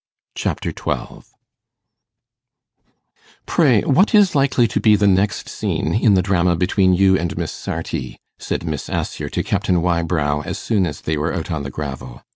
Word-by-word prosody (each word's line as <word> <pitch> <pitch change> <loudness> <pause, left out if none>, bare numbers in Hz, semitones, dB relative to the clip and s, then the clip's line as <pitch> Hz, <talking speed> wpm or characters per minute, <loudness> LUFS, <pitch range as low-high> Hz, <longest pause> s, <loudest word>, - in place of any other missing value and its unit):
Chapter - - -3
12 - - -5 2.2
'Pray, 135 - +3
what 190 - +3
is 205 -3 +5
likely 135 -4 +2
to 110 - -2
be 110 -1 +5
the 105 0 +1
next 100 +1 +1
scene 80 - -2
in 110 -2 +3
the 90 - +2
drama 90 -2 +2
between 95 +2 +2
you 95 +1 +4
and 85 -1 -3
Miss - - -3
Sarti?' 65 -2 -5 0.2
said - - -3
Miss 75 -3 -4
Assher - - -3
to - - -2
Captain 90 -1 0
Wybrow 85 -4 0
as - - -5
soon 100 -6 0
as 75 -2 -7
they 80 -1 -2
were 75 +5 -1
out 85 0 -4
on 80 -3 -2
the 70 - -5
gravel. 65 -4 -7
90 Hz, 165 wpm, -20 LUFS, 80-105 Hz, 2.2 s, is